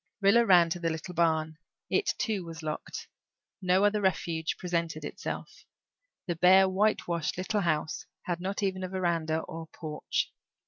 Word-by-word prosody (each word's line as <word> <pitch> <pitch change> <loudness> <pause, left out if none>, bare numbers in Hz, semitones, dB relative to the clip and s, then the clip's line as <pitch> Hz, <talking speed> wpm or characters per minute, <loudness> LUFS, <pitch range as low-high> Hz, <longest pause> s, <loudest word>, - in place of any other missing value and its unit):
Rilla 205 +4 +5
ran 175 -4 +6
to 175 - -1
the 165 -1 0
little 160 +3 -5
barn. 160 -2 +1 0.3
It, - - +1
too, 210 -5 -1
was 165 -1 -8
locked. 155 -1 -5 0.5
No 185 +1 +3
other 205 0 +2
refuge 170 -4 0
presented 170 -3 -2
itself. - - -6 0.6
The 175 - -2
bare 185 +3 +6
whitewashed 185 -5 0
little 195 +3 0
house 155 -3 -1 0.2
had 175 -1 -2
not 195 +3 -2
even 190 -1 -1
a 185 - -3
veranda 170 -4 0
or 165 0 -7
porch. 155 -2 -3
175 Hz, 150 wpm, -29 LUFS, 160-190 Hz, 0.6 s, ran